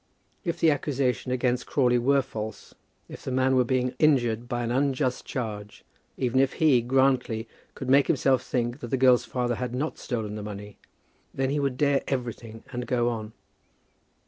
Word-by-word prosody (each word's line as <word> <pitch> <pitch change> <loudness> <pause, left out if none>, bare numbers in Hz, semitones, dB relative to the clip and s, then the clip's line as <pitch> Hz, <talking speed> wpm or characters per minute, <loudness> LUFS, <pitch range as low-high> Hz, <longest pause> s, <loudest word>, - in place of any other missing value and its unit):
If 170 -4 -2
the 160 - +5
accusation 135 -3 -1
against 125 0 0
Crawley 125 -3 +2
were 135 +3 +3
false, 110 -4 -7 0.3
if - - -10
the - - -4
man 130 +1 +2
were 130 - +4
being 125 0 0
injured 120 -6 +2
by 120 0 -1
an 120 - -2
unjust 130 0 0
charge, 105 -4 -5 0.3
even 130 0 +1
if 135 0 +3
he, 145 -6 +4
Grantly, 125 -2 +1 0.3
could 130 - -6
make 140 +2 +5
himself 135 -2 +2
think 120 +1 -2
that 120 - -6
the 130 - 0
girl's 125 -1 +5
father 125 -1 -1
had 125 -1 -3
not 150 +5 -3
stolen 110 -5 -3
the 105 - -5
money, 105 0 -8 0.6
then 135 0 0
he 145 - 0
would 135 -3 -1
dare 140 -1 +2
everything 120 -4 -4
and 125 -1 -4
go 120 -1 +1
on. 110 -2 -5
125 Hz, 175 wpm, -26 LUFS, 120-135 Hz, 0.6 s, the